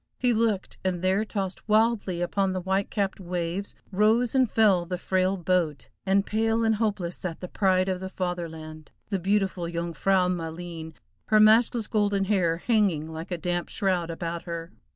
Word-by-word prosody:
He 250 -1 +2
looked, 220 -4 0
and 185 -2 -1
there 190 +3 +2
tossed 195 -1 -5
wildly 215 -5 +2
upon 190 +2 0
the 185 - -1
white 190 +2 0
capped 200 -2 -1
waves, 180 +1 -3 0.2
rose 220 +4 +3
and 260 -3 +3
fell 200 -6 +4
the 180 +1 -4
frail 185 +1 0
boat, 170 -4 0 0.2
and 195 +1 +3
pale 225 +1 +1
and 225 0 +3
hopeless 200 -6 -1
sat 170 -3 -5
the 180 - -6
pride 185 -1 +2
of 185 -1 -1
the 190 0 -5
Fatherland, 160 -4 -5 0.2
the 195 -3 -1
beautiful 190 -2 0
Jung 170 0 -3
frau 185 +3 +2
Maleen, 165 -2 -5 0.3
her 215 - +5
matchless 220 +1 +5
golden 205 -2 +1
hair 185 -5 +1
hanging 180 -7 +1
like 160 +2 -7
a 175 - -2
damp 175 +1 -2
shroud 185 -5 0
about 170 0 -4
her. 170 0 -5
185 Hz, 175 wpm, -26 LUFS, 175-210 Hz, 0.3 s, her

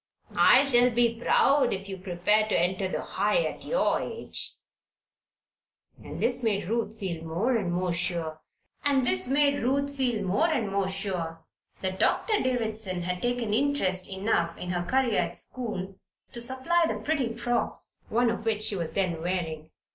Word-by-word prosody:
I 260 - +7
shall 250 -3 +5
be 235 -1 +2
proud 275 -3 +4
if 195 0 -4
you 195 - -5
prepare 190 +3 +1
to - - +2
enter 185 +2 0
the - - -3
High - - +1
at - - -5
your - - +1
age." 460 - -3 1.5
And - - -8
this 250 +1 +2
made 205 -5 0
Ruth 225 0 -2
feel 170 -5 -4
more 180 +11 0
and 195 -6 -1
more 180 0 0
sure 170 -3 -2 0.4
that 275 -3 +2 2.9
Doctor 445 - +2
Davison 220 -7 -1
had 180 +1 -3
taken 245 -3 -1
interest 220 -8 +1
enough 190 -4 0
in 180 - -4
her 175 -1 -1
career 260 -4 +2
at - - -2
school 195 -6 -4 0.3
to 235 - -5
supply 265 +8 +2
the - - -2
pretty 270 -7 -1
frocks, 240 0 -2
one 235 0 +2
of 225 - -4
which 220 -2 0
she 210 - 0
was 170 -4 -3
then 180 -4 -1
wearing. 165 -3 -3
215 Hz, 140 wpm, -27 LUFS, 180-245 Hz, 2.9 s, I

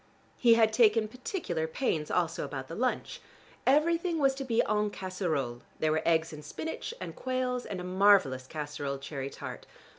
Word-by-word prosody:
He 235 -2 +5
had 220 -1 +4
taken 220 -1 +4
particular 220 - -3
pains 160 - -1
also 170 -2 0
about 135 -2 -5
the - - -6
lunch: 255 +2 -1 0.5
everything 330 +5 +3
was 275 -3 +3
to 270 0 -5
be 235 -3 +2
en 210 0 +1
casserole; 165 -12 -3 0.2
there 155 - +1
were 155 - +1
eggs 165 -1 +2
in 150 - -8
spinach, 320 - -5
and - - -6
quails, 255 -1 -2
and 195 - -4
a - - -5
marvelous 180 -9 +4
casseroled 145 -2 -4
cherry 135 -2 -4
tart. - - -8
190 Hz, 170 wpm, -30 LUFS, 155-250 Hz, 0.5 s, He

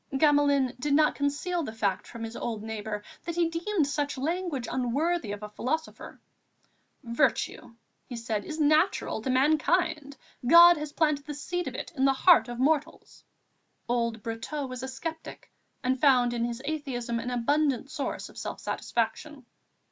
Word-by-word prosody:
Gamelin 285 -3 +3
did 285 +2 +1
not 305 0 +4
conceal 295 +5 -1
the 250 -8 -5
fact 200 -3 -1
from 230 -1 -8
his 225 +1 -6
old 225 -3 -4
neighbour 215 -1 -5 0.2
that 340 -1 -4
he 345 -1 +2
deemed 340 0 0
such 285 0 -2
language 310 -3 -2
unworthy 265 +1 0
of 205 0 -6
a 210 - -6
philosopher. 300 +9 -4 0.8
"Virtue," 235 -1 -1 0.4
said 225 -2 -2
he, - - -12
"is 315 0 -5
natural 310 - +2
to 260 - -3
mankind; 300 +2 +1 0.3
God 340 +3 +9
has 300 0 -5
planted 300 -2 0
the 295 - -5
seed 355 +5 -3
of - - -5
it - - -6
in 265 -2 +2
the 270 - +4
heart 345 +4 +5
of 240 0 -6
mortals." 300 +4 -1 0.6
Old 235 -2 -1
Brotteaux 235 +6 -4
was 255 -1 -6
a 265 - -4
sceptic 320 +5 -7 0.3
and 255 0 0
found 250 -4 +4
in 235 -1 0
his 240 +2 -5
atheism 260 -6 -3
an 240 - -4
abundant 275 +2 0
source 290 -3 -4
of - - -11
self - - -5
satisfaction. 255 +4 -3
275 Hz, 165 wpm, -28 LUFS, 235-310 Hz, 0.8 s, God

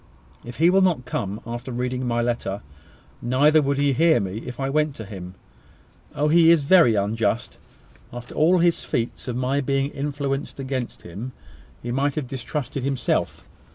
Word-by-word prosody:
If 120 0 -9
he 170 +3 +5
will 195 +1 +4
not 170 -10 +2
come 100 -3 -3
after 120 +2 -6
reading 125 +1 -2
my 120 0 +1
letter, 115 -4 -2 0.6
neither 145 +6 +4
would 140 -1 0
he 140 -1 +2
hear 160 +4 +4
me 100 +2 -3
if 125 +1 -7
I 135 - -1
went 150 0 0
to 110 - -8
him. 95 -3 -9 0.8
Oh! 150 +2 +1
he 165 +1 +6
is 165 -3 +5
very 155 -7 +5
unjust! 110 +3 -1 0.5
After 120 0 -9
all 170 +4 +4
his 170 -1 +2
feats 120 +2 -3
of 125 - -2
my 130 +3 0
being 135 +1 0
influenced 140 0 -3
against 130 -2 -4
him, 105 +9 -7 0.5
he 120 - -3
might 135 +2 0
have 150 - -2
distrusted 135 +1 -4
himself. 135 -1 -1
130 Hz, 170 wpm, -23 LUFS, 120-145 Hz, 0.8 s, he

